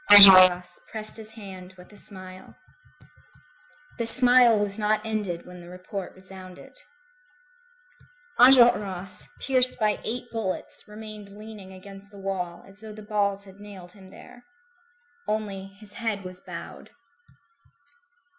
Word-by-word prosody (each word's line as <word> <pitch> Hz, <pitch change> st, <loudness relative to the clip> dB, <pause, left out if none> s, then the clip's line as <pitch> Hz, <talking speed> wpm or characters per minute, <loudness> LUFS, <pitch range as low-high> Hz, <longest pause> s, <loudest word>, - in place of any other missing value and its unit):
Enjolras 185 Hz, -3 st, +9 dB
pressed 215 Hz, -1 st, -4 dB
his 220 Hz, -1 st, -10 dB
hand 190 Hz, -4 st, -11 dB
with 180 Hz, +3 st, -16 dB
a -, -, -14 dB
smile. 185 Hz, -2 st, -12 dB, 1.4 s
This 230 Hz, -1 st, +1 dB
smile 245 Hz, -2 st, +5 dB
was 205 Hz, 0 st, -2 dB
not 215 Hz, +1 st, 0 dB
ended 205 Hz, -6 st, -3 dB
when 180 Hz, 0 st, -12 dB
the 175 Hz, -, -13 dB
report 185 Hz, +1 st, -7 dB
resounded. 185 Hz, -1 st, -13 dB, 1.6 s
Enjolras, 210 Hz, -8 st, +4 dB
pierced 255 Hz, -2 st, +1 dB
by 210 Hz, -1 st, 0 dB
eight 245 Hz, +1 st, -5 dB
bullets, 220 Hz, -5 st, -5 dB
remained 210 Hz, -1 st, -10 dB
leaning 210 Hz, -3 st, -11 dB
against 195 Hz, +1 st, -13 dB
the 205 Hz, -, -15 dB
wall, 185 Hz, -3 st, -4 dB
as 195 Hz, +1 st, -15 dB
though 220 Hz, -1 st, -10 dB
the 215 Hz, 0 st, -11 dB
balls 200 Hz, -1 st, -1 dB
had 195 Hz, 0 st, -15 dB
nailed 195 Hz, -4 st, -11 dB
him 190 Hz, -1 st, -16 dB
there. 245 Hz, +5 st, -15 dB, 0.8 s
Only, 205 Hz, -3 st, -3 dB
his 205 Hz, +1 st, -10 dB
head 220 Hz, -4 st, -3 dB
was 185 Hz, 0 st, -10 dB
bowed. -, -, -10 dB
200 Hz, 125 wpm, -25 LUFS, 185-215 Hz, 1.6 s, Enjolras